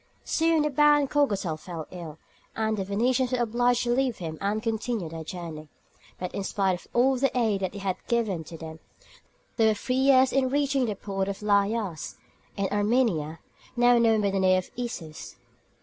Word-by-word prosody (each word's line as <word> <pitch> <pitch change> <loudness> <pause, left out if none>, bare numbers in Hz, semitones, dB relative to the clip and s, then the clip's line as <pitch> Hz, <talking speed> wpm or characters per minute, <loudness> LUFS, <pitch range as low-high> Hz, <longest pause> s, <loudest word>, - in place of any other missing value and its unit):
Soon 325 -1 +2
the 300 - 0
baron 295 0 +4
Cogatal 205 - 0
fell 165 -3 -7
ill, 165 -4 -8 0.4
and 220 -1 0
the 195 - -2
Venetians 245 +6 0
were - - +2
obliged 245 +1 +1
to 240 - 0
leave 255 -2 0
him 160 -3 -6
and 210 +2 -1
continue 225 -4 -2
their 160 0 -7
journey; 160 -3 -7 0.5
but 180 - -5
in 200 - -3
spite 195 -1 0
of - - -19
all 260 +2 +3
the 275 +2 +2
aid 220 -5 +1
that 190 +1 -3
had 195 -2 -2
been - - -33
given 220 -8 0
to 165 - -9
them, 160 0 -9 0.8
they 225 -2 +4
were 215 - +3
three 250 +4 -3
years 265 0 +4
in 265 -1 +2
reaching 275 -1 +1
the 215 -3 -2
port 195 -1 -3
of 200 -1 -3
Laïas, 200 -4 0 0.4
in 200 - 0
Armenia, 205 -8 +1 0.3
now 240 0 +5
known 225 -2 +3
by 200 -1 +1
the 195 - 0
name 185 0 +4
of 185 - -4
Issus. 190 -11 -6
215 Hz, 190 wpm, -26 LUFS, 185-245 Hz, 0.8 s, now